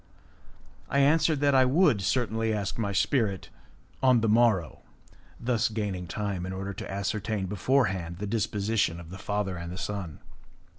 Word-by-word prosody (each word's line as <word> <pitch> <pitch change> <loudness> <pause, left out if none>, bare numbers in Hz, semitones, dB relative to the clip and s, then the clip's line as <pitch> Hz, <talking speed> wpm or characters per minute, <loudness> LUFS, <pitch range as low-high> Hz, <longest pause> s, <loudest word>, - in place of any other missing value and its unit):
I - - 0
answered 150 +1 +3
that 145 -1 +3
I 130 -1 +6
would 135 - +3
certainly 115 +2 0
ask 105 0 -2
my 100 -3 -1
spirit 100 -2 0 0.5
on 130 -3 +4
the 115 - +1
morrow, 110 -7 +2 0.6
thus 120 -2 +1
gaining 100 -5 -3
time 100 -1 -3
in 95 +1 -4
order 95 +1 -4
to - - -7
ascertain 100 +1 -2
before 125 +8 +2
hand 85 -4 -4
the 105 - -4
disposition 105 -3 0
of 85 -1 -11
the 95 - -8
father 100 -3 -2
and 85 - -6
of 90 +2 -6
his - - -5
son. 95 -8 -5
105 Hz, 165 wpm, -28 LUFS, 95-115 Hz, 0.6 s, I